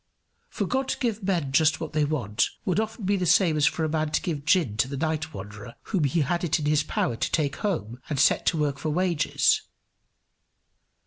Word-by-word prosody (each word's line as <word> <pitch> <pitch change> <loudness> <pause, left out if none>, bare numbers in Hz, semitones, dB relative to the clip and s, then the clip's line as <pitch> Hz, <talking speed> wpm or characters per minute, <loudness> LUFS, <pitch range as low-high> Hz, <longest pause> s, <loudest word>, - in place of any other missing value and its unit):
For 205 - -2
God 260 +6 -1
to - - -2
give 225 -4 -2
men 175 -8 -1
just 155 +2 +3
what 160 -1 -6
they 150 -1 +2
want 120 -8 0 0.2
would 185 +2 +1
often 220 -1 -3
be 200 +1 +2
the 180 -2 -1
same 175 -1 +4
as 150 -2 +3
for 160 +4 -1
a - - +1
man 155 0 0
to - - +2
give 150 -6 -3
gin 160 - +2
to 130 - +2
the 140 +1 -5
night 160 +1 -2
wanderer 105 +2 -9
whom 185 -8 0
he 150 +4 +1
had 170 +5 -1
it 165 -2 +1
in 150 - -4
his 150 0 +3
power 120 - -1
to 115 - -2
take 145 -4 0
home 130 - -3
and 145 -4 -2
set - - +3
to 165 - +2
work 145 -2 -1
for 155 - -2
wages. 170 -1 +2
155 Hz, 220 wpm, -26 LUFS, 140-180 Hz, 0.2 s, same